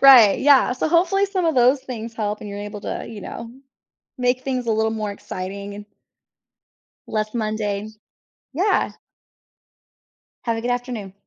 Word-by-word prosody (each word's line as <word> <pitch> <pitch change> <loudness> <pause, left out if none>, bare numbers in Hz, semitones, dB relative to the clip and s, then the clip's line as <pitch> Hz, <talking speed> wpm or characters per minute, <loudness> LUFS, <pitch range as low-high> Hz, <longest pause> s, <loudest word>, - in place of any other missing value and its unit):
Right, 250 -7 +9
yeah. 275 -3 +6
So, 255 - -1
hopefully, 360 +4 +3
some 380 -3 -1
of 325 - +2
those 255 +2 +5
things 230 -3 -6
help, 210 -1 -2
and 210 - -7
you're 200 0 -6
able 205 0 -6
to, - - -3
uh, - - -6
you 215 -3 -8
know, 230 - -7 0.7
make 250 0 +1
things 255 -3 -2
a - - +3
little 220 0 +2
more 215 -2 -2
exciting 200 +1 -6
and 205 0 -9 1.2
less 215 0 -2
mundane. 215 -2 -2 0.6
Yeah. 380 +8 +2 1.5
Have 230 -1 0
a - - -3
good 245 +1 0
afternoon. 245 -6 -4
230 Hz, 160 wpm, -22 LUFS, 210-260 Hz, 1.5 s, Right